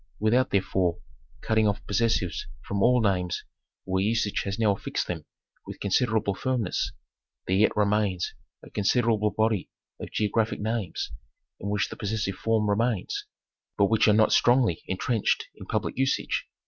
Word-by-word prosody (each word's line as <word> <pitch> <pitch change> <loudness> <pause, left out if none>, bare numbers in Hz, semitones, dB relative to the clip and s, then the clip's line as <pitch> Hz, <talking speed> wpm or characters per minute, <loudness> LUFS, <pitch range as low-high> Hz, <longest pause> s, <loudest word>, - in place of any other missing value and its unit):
Without, 120 +4 +3
therefore, 95 -2 +1 0.4
cutting 110 -1 +2
off 105 0 -1
posses 115 +3 +2
sives 90 -3 -4 0.2
from 100 0 -2
all 125 +3 +5
names 90 -4 0 0.4
where 95 0 0
usage 110 -1 +1
has 100 0 -2
now 110 -3 +3
fixed - - -3
them - - -5 0.4
with - - -8
consid 100 +5 +2
erable 110 -3 0
firmness, 125 -6 -1 0.5
there 95 - +1
yet 105 +1 +3
remains 100 -3 +1 0.3
a - - -13
considerable 110 0 +2
body 110 -3 0 0.3
of - - -6
geo 105 -2 0
graphic 115 -1 +1
names 110 - -2 0.5
in 100 - -4
which 105 +1 0
the - - -7
possessive 105 -1 -2
form 110 -2 +1
remains, 105 0 0 0.5
but 100 +1 +3
which 110 - +4
are 105 - +6
not 110 +1 +4
strongly 120 -8 +4
intrenched 105 +4 0
in - - -12
public - - -2
usage. 135 +1 0
105 Hz, 160 wpm, -27 LUFS, 100-115 Hz, 0.5 s, are